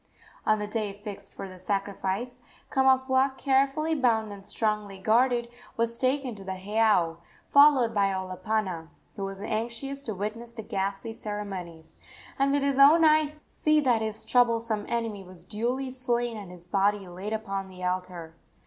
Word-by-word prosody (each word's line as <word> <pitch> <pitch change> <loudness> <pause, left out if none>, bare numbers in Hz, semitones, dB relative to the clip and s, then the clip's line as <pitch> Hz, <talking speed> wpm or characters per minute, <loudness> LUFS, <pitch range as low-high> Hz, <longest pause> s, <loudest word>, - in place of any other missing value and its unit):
On 215 - +4
the 210 - -3
day 210 -1 -2
fixed 205 0 -9
for - - -6
the 185 -1 -12
sacrifice 200 +5 -2 0.3
Kamapuaa, 265 0 +3
carefully 275 +4 +2
bound 230 -7 +2
and 200 -1 -9
strongly 210 -2 -2
guarded, 235 +4 +2 0.3
was 230 0 0
taken 260 -1 0
to 200 -2 -10
the 190 0 -4
heiau, 205 -4 +2 0.3
followed 280 -5 +6
by 200 -1 +3
Olopana, 185 -2 -2 0.3
who 200 - -5
was 195 0 -6
anxious 235 +6 -3
to 220 - -3
witness 225 +4 -5
the 225 -2 -7
ghastly 195 +3 -3
ceremonies, 195 -7 -6 0.4
and 275 0 +3
with 285 0 +2
his 280 -1 +1
own 310 +4 +8
eyes 305 -1 +3
see 305 0 +2
that 245 -5 +2
his 220 0 -4
troublesome 230 -3 +2
enemy 225 -4 -2
was 180 -2 -11
duly 245 +7 -2
slain 240 -2 -1
and 205 -4 -8
his 180 -1 -12
body 200 +1 +1
laid 185 +4 -6
upon 195 -3 -3
the 185 -1 -10
altar. 180 -3 -3
220 Hz, 160 wpm, -27 LUFS, 195-255 Hz, 0.4 s, own